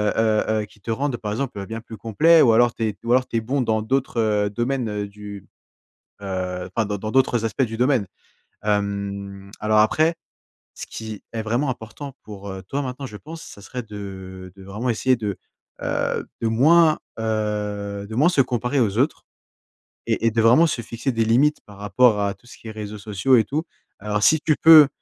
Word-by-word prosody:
heu, 110 -1 +2
heu, 110 -1 0
qui 105 - -22
te 100 - -9
rendent, 135 +2 -1
par 105 -3 -4
exemple, 110 -5 -4
bien 110 +2 -6
plus 110 -1 -10
complet. 160 +11 +4
Ou 115 - +6
alors, 120 +1 +4
tu 115 - -2
es 105 - -3
ou 115 - -2
alors 125 +1 +3
tu - - -6
es - - 0
bon 130 +5 -1
dans 110 -3 +1
d'autres, 130 +1 -1
heu, 105 -2 +1
domaines, 120 +3 -1
heu, 105 -1 -3
du 100 -1 -10 0.8
heu, 90 -2 -3
enfin, 115 -2 +1
dans 100 0 -3
dans 110 +2 -4
d'autres 130 -3 +2
aspects 115 +4 0
du 115 -3 -1
domaine. 125 -3 +2 0.6
Hem, 100 -1 -2
alors, 110 0 +2
après, 155 +10 +3 0.6
ce - - -7
qui 110 -2 -7
est 115 - -3
vraiment 120 +6 0
important 125 +4 -7
pour, 100 -1 -9
heu, 95 0 -7
toi 140 +1 -2
maintenant, 130 +1 -5
je 105 - -9
pense, 160 +8 -10
ça 100 - -12
serait 125 +5 -6
de 95 -3 -9
de 95 - -13
vraiment 105 +6 -3
essayer 125 +3 +2
de, 105 -4 -4 0.4
heu, - - -1 0.2
de 115 - +2
moins, 155 +7 +5 0.2
heu, 105 -2 -2
de 110 - -8
moins 145 +8 +4
se 160 -6 +4
comparer 125 +2 -1
aux 110 -3 +1
autres, 140 +5 +1 0.9
et 115 - +1
et - - +3
de 115 +1 +1
vraiment 125 +9 +6
se 130 - -2
fixer 115 +4 -3
des 115 -2 0
limites, 135 +7 +3
par 105 -1 -14
rapport 105 +1 +3
à 100 -1 0
tout 95 - -28
ce - - -12
qui - - -13
est - - -5
réseaux 105 -1 -7
sociaux, 105 +5 +2
et 115 - +4
tout. 150 +8 -2 0.4
Alors 105 +1 -2
si 155 +10 +5
tu 155 - +2
peux, 155 -3 +10
110 Hz, 210 wpm, -22 LUFS, 105-125 Hz, 0.9 s, peux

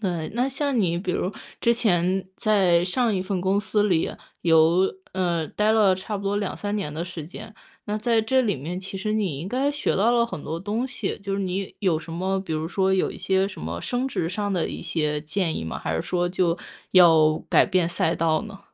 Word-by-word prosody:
那 175 -6 -2
那 245 +4 0
像 275 -1 -1
你 170 -3 +1
比 180 - -3
如 185 - -1 0.3
之 235 - +4
前 190 -4 +1
在 185 -5 +3
上 225 +4 +1
一 185 - -1
份 190 -1 -2
公 190 +2 +1
司 210 +1 +1
里 175 -6 +1 0.3
有， 165 +3 +4 0.2
呃， 175 -4 0
待 210 +1 +1
了 210 -4 +5
差 190 +3 -5
不 200 - -7
多 200 +1 0
2-3 205 0 -3
年 195 -8 -3
的 160 +3 -3
时 175 -3 -7
间。 185 +6 -10 0.3
那 210 0 -2
在 230 +1 +2
这 260 +4 +2
里 210 -6 0
面， 160 +7 -5
其 195 +1 -7
实 210 +3 -2
你 195 -10 -1
应 175 - -5
该 265 +5 +1
学 290 0 -1
到 215 +5 +3
了 235 -1 +4
很 155 -10 -7
多 160 +2 -4
东 210 +7 -2
西， 225 -6 -4
就 200 0 -4
是 200 - -1
你 190 0 -3
有 180 -6 +2
什 160 +1 -9
么， 190 +3 -1
比 185 -4 -5
如 155 0 -1
说 190 +1 +1
有 190 - +1
一 - - -9
些 190 0 +1
什 195 - -8
么 85 +2 -4
升 245 - -1
职 175 -11 -2
上 205 +3 -2
的 180 -3 0
一 - - -6
些 150 -2 -1
建 160 +2 -1
议 - - -4
吗？ 80 - -4
还 80 - -3
是 80 - -1
说 175 -1 0
就 175 -2 +1 0.4
要 160 -4 +6
改 - - +5
变 185 -3 +1
赛 170 -1 +1
道 160 -1 +1
呢？ 200 -3 -10
190 Hz, 245 characters per minute, -24 LUFS, 170-210 Hz, 0.4 s, 要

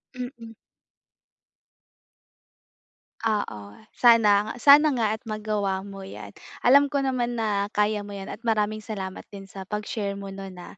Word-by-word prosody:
Mm. 245 -2 -8 2.7
Oo. 210 - -1 0.4
Sana, 215 -3 +5
sana 290 +2 +8
nga 235 -4 +1
at - - -34
magawa 210 -3 -2
mo 195 -1 -9
yan. 105 - -9 0.3
Alam 280 +3 +6
ko 280 0 -1
naman 255 -3 -1
na 210 -3 0
kaya 210 0 +1
mo 205 - -9
yan 195 -1 -7
at 230 - -9
maraming 215 -1 0
salamat 190 -3 -6
din 195 -1 -10
sa 190 0 -9
pag-share 210 0 -3
mo 200 0 -7
no'n, 195 -1 -8
ah, 175 - -12
210 Hz, 140 wpm, -25 LUFS, 200-230 Hz, 2.7 s, sana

